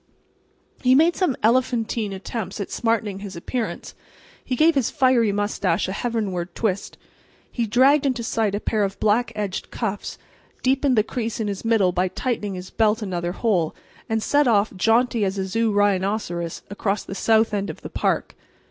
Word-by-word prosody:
He 255 0 +5
made 325 +5 +4
some 360 -9 +1
elephantine 230 -2 +1
attempts 195 +1 -5
at 200 - -4
smartening 220 -4 -1
his 195 -1 -8
appearance. 225 +7 -4 0.5
He 255 - -2
gave 320 +6 +5
his 270 -6 +1
fiery 255 -6 +3
mustache 200 -4 0
a - - -3
heavenward 195 -6 -3
twist; 200 -4 -2 0.5
he 235 -2 -1
dragged 270 +6 +4
into 250 -3 -1
sight 220 -3 0
a - - -1
pair 215 -1 0
of 195 0 -3
black 220 +3 +2
edged 205 -3 -3
cuffs, 205 -4 -4 0.5
deepened 265 -1 +2
the 215 - +5
crease 230 0 -4
in 220 - -1
his 200 -2 -4
middle 225 -5 +3
by 180 +1 +1
tightening 210 -1 -3
his 180 0 -8
belt 220 0 +2
another 175 -3 -3
hole, 185 -8 0 0.3
and 220 -1 0
set 290 -1 +3
off, 210 -3 +2
jaunty 225 +3 +2
as 195 0 -1
a 190 - -1
zoo 225 +3 0
rhinoceros, 195 -4 0
across 200 0 -1
the - - -7
south 220 +2 +2
end 200 -1 -1
of - - -8
the - - -7
park. - - -1
215 Hz, 175 wpm, -23 LUFS, 195-235 Hz, 0.5 s, He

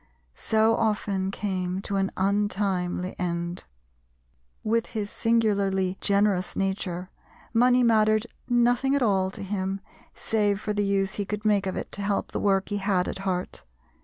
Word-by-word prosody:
so 220 - +2
often 205 -3 0
came 185 -2 -2
to 200 0 -4
an 195 0 +1
untimely 190 -2 0
end. 175 0 -3 1.0
With 230 +1 +1
his 210 -2 -4
singularly 200 -5 +1
generous 200 -2 +2
nature 190 -2 -2 0.4
money 245 +2 +4
mattered 215 -1 +4 0.2
nothing 245 +3 +3
at 280 - +2
all 190 -4 +2
to 195 - -8
him 195 0 -2 0.4
save 205 -2 +1
for 210 0 -2
the 205 0 0
use 195 -1 +1
he 205 - -2
could 210 +2 -5
make 205 -2 +3
of 190 - -2
it - - -5
to 200 - -6
help 200 0 -1
the - - -2
work 195 -1 +1
he 205 - -1
had 195 -2 +1
at - - -4
heart. 185 -2 -3
200 Hz, 155 wpm, -26 LUFS, 190-215 Hz, 1.0 s, money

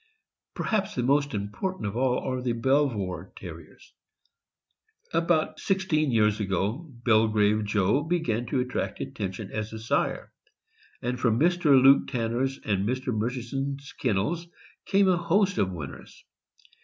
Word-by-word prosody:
Perhaps 210 -1 -1
the - - 0
most 140 0 +2
important 105 - -3
of 100 +1 -3
all 125 0 +2
are 130 -1 -3
the 125 -1 0
Belvoir 115 -7 0
Ter - - -7
riers. - - -16 1.2
About 165 -1 +1
sixteen 185 -6 +1
years 105 -2 +3
ago, 105 - -2 0.2
Belgrave 110 -2 +3
Joe 105 +5 +2
began 145 -8 -1
to 125 +2 0
attract 125 0 -3
attention 95 +1 -5
as 110 0 -4
a - - -5
sire, 110 +1 -1 0.7
and 125 +1 -2
from 115 -3 +2
Mr. 165 -4 +4
Luke 135 +2 +6
Tanner' 120 +1 -1
s 135 0 -4
and 100 0 0
Mr. 130 0 -2
Murchison's 135 +5 -3
kennels 130 - -1 0.4
came 195 0 +4
a 185 -2 +4
host 185 +3 +1
of 95 - +2
winners. 70 -6 -9
125 Hz, 140 wpm, -27 LUFS, 105-150 Hz, 1.2 s, Luke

